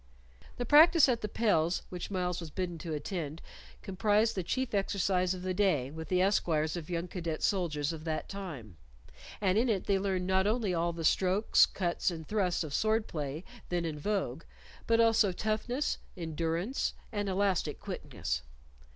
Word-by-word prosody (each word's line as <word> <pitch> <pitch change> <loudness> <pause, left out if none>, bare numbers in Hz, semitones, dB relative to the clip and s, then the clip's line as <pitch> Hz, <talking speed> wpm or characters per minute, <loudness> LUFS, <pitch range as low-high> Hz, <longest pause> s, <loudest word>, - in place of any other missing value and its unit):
The 245 - -2
practice 315 +2 +7
at 240 -3 +1
the 210 - -2
pels 180 -7 +1
which 180 -1 -6
Myles 180 -2 -1
was 165 -2 -7
bidden 175 0 -4
to 160 -1 -5
attend 155 -1 -4 0.4
comprised 210 +3 +2
the 190 - -2
chief 255 +8 -2
exercise 190 -2 +1
of 180 - -8
the 185 0 -1
day 180 -10 +1
with 160 +1 -7
the 185 0 +2
esquires 160 -5 +1
of 170 -2 -6
young 170 0 -2
cadet 170 -3 -4
soldiers 165 -5 0
of 155 -1 -8
that 160 -1 -2
time, 145 - -7 0.6
and 195 0 +2
in 245 +2 +2
it 200 -4 0
they 195 -1 +2
learned 190 -2 -1
not 190 +1 +2
only 215 -3 +1
all 170 0 +1
the 165 -1 -6
strokes, 190 +6 +4
cuts, 175 -1 -1
and 160 -3 -7
thrusts 185 -5 0
of 150 -3 -6
sword 220 +3 +2
play 150 +1 -4 0.3
then 175 -1 -1
in 155 -2 -4
vogue, 175 -6 -1 0.5
but 230 0 +3
also 225 -3 +4
toughness, 220 +8 -1 0.2
endurance, 165 - -2 0.2
and 205 -2 -2
elastic 190 -5 0
quickness. 100 - -4
185 Hz, 170 wpm, -31 LUFS, 165-205 Hz, 0.6 s, practice